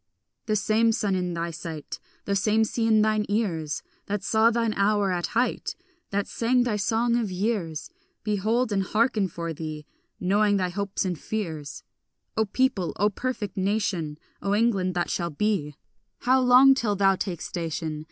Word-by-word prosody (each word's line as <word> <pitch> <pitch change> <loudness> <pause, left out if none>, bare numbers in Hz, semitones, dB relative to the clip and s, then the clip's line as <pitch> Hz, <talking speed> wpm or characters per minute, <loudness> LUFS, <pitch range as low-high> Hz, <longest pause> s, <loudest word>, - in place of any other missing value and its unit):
The 215 - +1
same 220 +2 +3
sun 205 -3 0
in 180 -2 -1
thy 170 0 -2
sight, 160 -2 -7 0.3
The 200 - 0
same 215 +2 +3
sea 225 +1 0
in 215 -1 +5
thine 215 -1 +2
ears, 170 -8 -1 0.2
That 205 0 -2
saw 220 +1 +4
thine 230 -1 0
hour 200 -1 +2
at 175 -1 -1
height, 245 - 0 0.3
That 200 0 0
sang 245 +2 +2
thy 235 -3 0
song 225 +3 +1
of 225 -4 -1
years, 185 -5 -2 0.3
Behold 220 +3 +1
and 195 -1 +2
hearken 215 +1 +1
for 170 -1 -5
thee, 155 -1 -6 0.3
knowing 205 +2 +3
thy 185 -2 0
hopes 200 +1 -2
and 180 -3 -2
fears. 160 -9 -5 0.5
O 220 - +2
people, 205 -4 0
O 210 +2 +2
perfect 215 -4 -3
nation, 190 -6 -1 0.2
O 200 +1 +1
England 200 -5 +1
that 175 -1 0
shall 170 -1 -1
be, 155 -3 -1 0.5
How 260 +1 +4
long 255 +2 +7
till 230 -6 0
thou 195 -1 +4
take 180 -3 -3
station? 160 -2 -4
205 Hz, 165 wpm, -26 LUFS, 175-220 Hz, 0.5 s, long